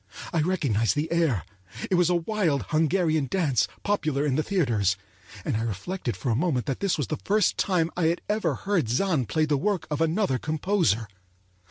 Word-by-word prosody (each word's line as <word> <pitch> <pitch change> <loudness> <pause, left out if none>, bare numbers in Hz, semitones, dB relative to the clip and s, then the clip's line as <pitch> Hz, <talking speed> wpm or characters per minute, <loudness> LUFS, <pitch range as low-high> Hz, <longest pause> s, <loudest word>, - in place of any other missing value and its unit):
I 165 - +2
recognized 140 - +1
the 150 +3 -2
air—it 105 - -2
was 180 -1 +4
a 180 - +3
wild 170 - 0
Hungarian 160 -2 +2
dance 145 - +1 0.2
popular 155 -8 0
in 145 - +1
the 155 - +2
theaters, 120 - +1 0.5
and - - 0
I 110 - 0
reflected 115 - -3
for 120 +6 -1
a - - +2
moment 135 -3 0
that 135 - -2
this 195 -3 0
was 145 - -1
the - - -3
first 210 -1 +2
time 175 -4 +1
I 175 - 0
had 165 +2 +1
ever 215 +1 0
heard 195 - 0
Zann 145 - +1
play 155 +9 +1
the 150 -1 +1
work 185 -1 0
of 150 +1 -1
another 165 -4 +1
composer. 155 - 0
155 Hz, 185 wpm, -26 LUFS, 125-180 Hz, 0.5 s, was